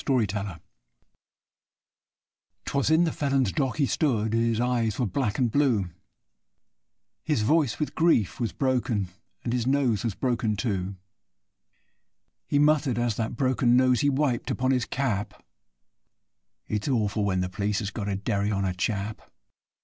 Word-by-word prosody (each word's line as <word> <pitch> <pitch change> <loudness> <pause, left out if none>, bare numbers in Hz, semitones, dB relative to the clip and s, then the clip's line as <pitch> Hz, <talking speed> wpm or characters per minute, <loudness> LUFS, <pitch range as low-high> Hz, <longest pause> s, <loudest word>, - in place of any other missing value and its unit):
A - - -17
DERRY 130 -5 +2
ON 105 -1 -2
A 95 - -6
COVE 85 - -14 2.1
'Twas 140 0 0
in 160 +2 +5
the 165 - +1
felon's 135 -8 0
dock 135 +3 -1
he 145 - +3
stood, 115 -7 0
his 115 -1 +1
eyes 120 -3 0
were 125 - +1
black 105 +1 -1
and 125 -4 +1
blue; 115 -11 +1 1.3
His 150 -9 0
voice 145 -1 +2
with 150 - -3
grief 160 - +2
was 115 -3 -1
broken, 120 -7 0 0.3
and 120 - -2
his 125 -1 -1
nose 130 -7 +2
was 115 -4 -2
broken, 120 -4 0
too; 100 -4 -2 1.5
He 145 - +1
muttered, 145 -3 +3
as 120 -2 0
that 115 0 -2
broken 130 -2 +3
nose 130 -2 +3
he 145 - +3
wiped 135 -3 0
upon 130 +1 0
his 125 -3 +1
cap 115 -7 -3 1.2
'It's 105 -1 -2
orful 110 -5 0
when 95 -2 +1
the 90 - -1
p'leece 100 +2 -1
has 105 -2 -2
got 100 -1 -4
a 100 - -1
derry 100 0 -1
on 100 -1 0
a 95 - -1
chap. 100 +2 -2
120 Hz, 160 wpm, -26 LUFS, 105-135 Hz, 2.1 s, in